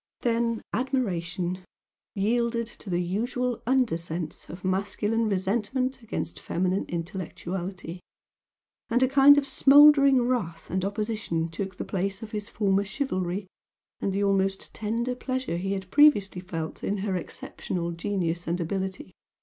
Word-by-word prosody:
Then 230 -1 0
admiration 185 -8 -1 0.5
yielded 235 +3 +1
to 220 -2 -9
the 175 0 +1
usual 240 +6 -1
under 255 -8 +3
sense 165 -1 -6
of 180 +2 -9
masculine 205 +4 0
resentment 235 +7 -1
against 215 -7 -4
feminine 185 +2 -1
intellectuality, 180 +1 -5 0.9
and 245 +3 +3
a - - +5
kind 275 +2 +7
of 280 -1 +1
smouldering 275 -1 +7
wrath 235 -10 -2
and 185 +1 0
opposition 200 -5 -2
took 190 +3 -5
the - - -5
place 195 +3 -2
of 215 - -8
his 210 0 -4
former 200 -2 +1
chivalry 195 -4 -2 0.5
and 195 - -1
the 200 +1 0
almost 195 -1 +1
tender 230 +3 -1
pleasure 255 -7 -3
he 195 +3 -2
had 190 -1 -5
previously 205 -11 +5
felt 165 -3 -5
in 205 - 0
her 195 -3 0
exceptional 170 0 -4
genius 170 -2 -2
and 170 +2 0
ability. 190 +2 -3
200 Hz, 135 wpm, -27 LUFS, 180-235 Hz, 0.9 s, kind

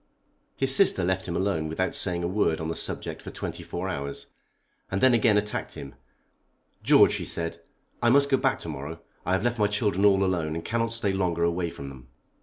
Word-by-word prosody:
His 135 0 +4
sister 180 - +4
left 95 +1 -1
him 85 - -3
alone 85 -4 -1
without 95 +4 -1
saying 90 -2 -1
a - - 0
word 90 -4 +1
on 80 0 -3
the - - -1
subject - - -3
for - - -8
twenty - - -5
four 90 +2 -5
hours, 70 -6 -4 0.6
and 95 - -1
then 130 +2 +5
again 110 -2 +4
attacked 105 0 -2
him. 70 - -9 0.9
"George," - - +6
she - - -2
said, 85 0 -4 0.4
"I 120 - +4
must 140 +3 +5
go 135 - +5
back - - +1
to - - -7
morrow. 75 +5 -6 0.3
I 90 - +2
have 95 - +1
left 120 -1 0
my 105 - +4
children 105 -2 0
all 100 -1 +5
alone 85 -5 -1
and 85 - -5
cannot 115 0 -1
stay 115 -4 -1
longer 90 -3 0
away 85 0 0
from 70 -3 -8
them." 65 -2 -13
95 Hz, 210 wpm, -26 LUFS, 85-105 Hz, 0.9 s, George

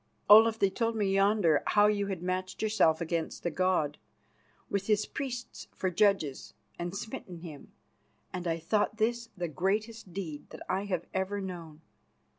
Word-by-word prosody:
Olaf, 220 +2 +8
they 195 -3 +2
told 230 +2 -1
me 200 -3 +1
yonder 195 -6 +3
how 205 0 +5
you 205 -1 +2
had 190 -3 -4
matched 185 +2 -3
yourself 180 -7 +3
against 165 -1 -3
the 175 - -1
god, 175 -4 +1 0.7
with 200 -1 -2
his 210 -1 +2
priests 250 -3 -6
for 185 - -1
judges, 175 -7 +1 0.2
and 175 +2 -4
smitten 185 -5 -7
him, 155 -5 -10 0.6
and 180 -1 -4
I 165 -1 0
thought 205 +6 0
this 235 +1 0
the 175 -1 -2
greatest 200 - -2
deed 165 -5 -6
that - - -11
ever - - +1 0.4
I 190 - +1
have 200 +1 -3
known. 165 -4 -8
190 Hz, 160 wpm, -30 LUFS, 170-210 Hz, 0.7 s, Olaf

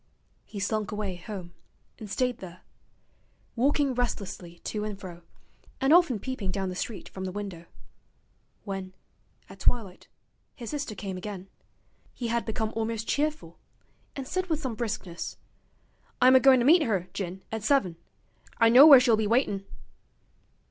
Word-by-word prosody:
He 205 - -8
slunk 210 +1 -1
away 205 -3 -3
home, 180 -1 -8 0.5
and 215 - -8
stayed 250 +3 -1
there: 180 -1 -10 0.9
walking 275 +2 +2
restlessly 200 -8 -4
to 210 -1 -3
and 210 -2 -5
fro, 175 -3 -9 0.6
and 270 +2 +4
often 340 -9 +5
peeping 215 -3 -4
down 190 0 -2
the 180 - -5
street 210 +3 -5
from 190 0 -7
the 185 - -3
window. 190 -4 -7 1.0
When, 190 -2 -6 0.5
at 195 0 -13
twilight, 195 -3 -1 0.5
his 235 -4 -7
sister 285 -7 -4
came 190 0 -5
again, 190 0 -7 0.7
he 240 -2 -4
had 235 0 0
become 220 0 -2
almost 225 0 -2
cheerful, 305 +2 -2 0.6
and 270 -2 -5
said 370 +3 -2
with 320 -3 -1
some 260 -6 -3
briskness: 215 -7 -5 0.8
'I'm 255 +1 +7
agoin' 260 0 +7
to - - +1
meet 330 +5 +7
'er, 195 - 0
Jin, 190 -1 -5
at 220 0 -3
seven. 210 - +2 0.6
I 230 -1 +5
know 260 +6 +9
where 280 -4 +11
she'll 245 -3 +4
be 215 -1 0
waitin'.' 205 -4 +1
215 Hz, 150 wpm, -27 LUFS, 190-255 Hz, 1.0 s, where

